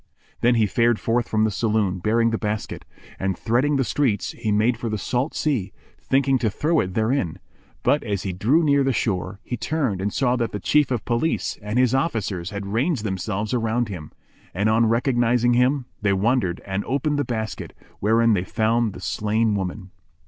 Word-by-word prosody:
Then 120 +1 +3
he 110 -2 +3
fared 115 +2 +2
forth 120 +1 0
from 110 0 +2
the 110 - +2
saloon 105 -3 0
bearing 115 +4 +2
the 115 - -1
basket; 105 -1 -4 0.3
and, 95 -1 -1
threading 125 +6 +1
the 135 - +2
streets, 120 -6 0
he 110 -2 -3
made 110 +4 +2
for 115 0 -4
the 110 - -2
salt 125 - -2
sea, 130 -11 -1 0.3
thinking 135 -1 +2
to 115 - +1
throw 155 - +1
it 90 0 -2
therein: 110 - 0 0.5
but 145 - +3
as 100 -4 -2
he 95 - -3
drew 125 - +2
near 140 -2 +3
the 135 -1 +1
shore, 100 -3 -2
he 125 - -4
turned 130 -10 -1
and 100 +1 -1
saw 125 -2 +1
that 115 -2 -2
the 105 - -3
Chief 150 +7 +2
of 120 -5 -2
Police 120 +7 -1
and 105 +3 -3
his 125 -1 +3
officers 105 - -1
had 100 -1 -5
ranged 120 - 0
themselves 105 +2 -2
around 115 -1 0
him; 85 -7 -7 0.4
and, 100 +4 +1
on 115 +1 +3
recognising 120 0 +2
him, 125 +2 +2 0.2
they 100 -2 +2
wondered 100 -2 0
and 95 +1 -2
opened 145 +3 0
the - - +2
basket, 110 -3 -4 0.3
wherein 115 +2 +3
they 90 -3 +1
found 110 +2 0
the - - -10
slain 110 +1 0
woman. 95 -1 -4
115 Hz, 190 wpm, -23 LUFS, 105-125 Hz, 0.5 s, Then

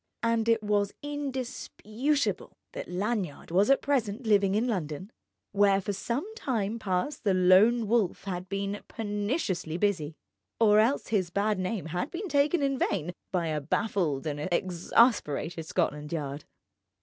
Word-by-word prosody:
And 230 0 +1
it 225 -1 +3
was 205 -1 0
indisputable 275 -1 -2
that - - -6
Lanyard 185 -4 -3
was 195 +7 +3
at 275 - +4
present 245 -4 0
living 200 -2 +3
in 220 +3 +2
London, 185 -2 -3 0.4
where 200 -1 +4
for 200 +1 -3
some 235 - -2
time 230 - -2
past 190 +9 -2
the 200 -4 +2
Lone 195 +6 +5
Wolf 215 -4 +1
had 185 -1 -5
been 200 +1 -3
perniciously 205 - -2
busy; 175 -6 0 0.4
or 210 -2 +6
else 235 +6 +2
his 190 -5 +1
bad 200 +2 0
name 185 0 -2
had 180 - -3
been 385 +3 -5
taken 290 +2 +2
in 275 -1 0
vain 175 +4 -1 0.2
by 180 -3 0
a 155 -1 -1
baffled 160 -3 -1
and 145 -1 -3
exasperated 175 - +1
Scotland 150 -4 -1
Yard. 145 -3 -4
205 Hz, 145 wpm, -28 LUFS, 180-230 Hz, 0.4 s, or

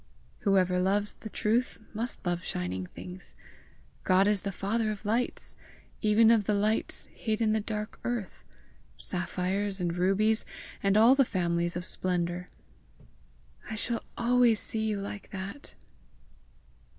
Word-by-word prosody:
"Whoever 185 -3 +3
loves 200 +3 +1
the 220 - -9
truth 230 +5 +1 0.2
must 230 0 -3
love 175 0 -1
shining 90 - -3
things! 180 - -8 0.7
God 185 +1 +4
is 205 -2 +2
the 200 - -3
father 215 +4 -1
of 210 0 -5
lights, 230 +4 0 0.5
even 220 +1 +5
of 220 -3 +4
the 210 - +2
lights 215 +2 +1
hid 220 -1 -2
in 220 -2 +2
the 220 - +2
dark 210 0 -4
earth 240 -5 -3 0.5
sapphires 190 +2 -2
and 175 -1 -1
rubies, 200 +5 +2 0.4
and 195 0 +3
all 230 +4 +8
the 275 0 +5
families 170 -5 0
of 175 0 -3
splendour." 180 -1 -2 1.2
"I 220 - -3
shall 230 +2 -1
always 240 -2 +4
see 220 -1 -2
you 210 -2 -1
like 200 0 -6
that!" 200 +7 -7
205 Hz, 140 wpm, -29 LUFS, 185-220 Hz, 1.2 s, all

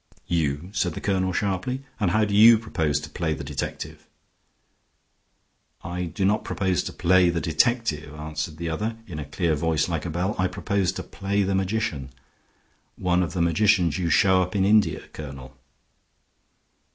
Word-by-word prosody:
"You!" 80 +1 -1
said 90 -5 -1
the - - -4
colonel, 95 -2 0
sharply. 100 +8 -2 0.2
"And 100 -5 +2
how 110 +4 +2
do 100 - -3
you 110 +3 +8
propose 80 -10 -1
to 75 - -7
play 80 -1 -1
the 75 - -7
detective?" 70 0 -6 1.8
"I 90 +1 -3
do 85 +4 -2
not 105 +2 +2
propose 95 -2 0
to - - -4
play 90 0 +4
the 85 0 0
detective," 80 -2 0
answered 75 +1 -5
the 85 +1 -4
other, 105 +8 -2
in 85 -7 -7
a 75 - -5
clear 80 +3 0
voice 80 0 0
like 85 -1 -3
a - - -3
bell. 90 +5 -1
"I 90 - +3
propose 90 0 -1
to 95 - -5
play 100 +2 -1
the 95 0 0
magician. 95 - -1 0.9
One 90 -1 +1
of 90 - -2
the 90 -3 +1
magicians 90 -1 +2
you 85 -2 0
show 95 +1 +4
up 90 +2 -3
in 95 -1 +2
India, 100 -5 +3
Colonel." 70 -3 -9
90 Hz, 170 wpm, -25 LUFS, 80-100 Hz, 1.8 s, you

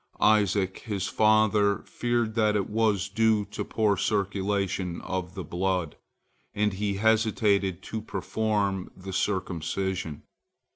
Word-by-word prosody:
Isaac, 100 -3 +3
his 100 -4 -3
father, 105 -1 +3
feared 120 -2 -1
that 110 -2 +2
it 100 -2 0
was 105 -3 +1
due 110 0 +2
to - - -3
poor 105 -3 +1
circulation 100 -3 -1
of 95 -1 -4
the 95 - -4
blood, 90 -3 -1 0.6
and 105 -1 +1
he 100 0 -1
hesitated 105 -3 +2
to 110 - -5
perform 105 -3 -1
the 95 +1 -7
circumcision. 90 -3 -2
100 Hz, 115 wpm, -27 LUFS, 95-110 Hz, 0.6 s, Isaac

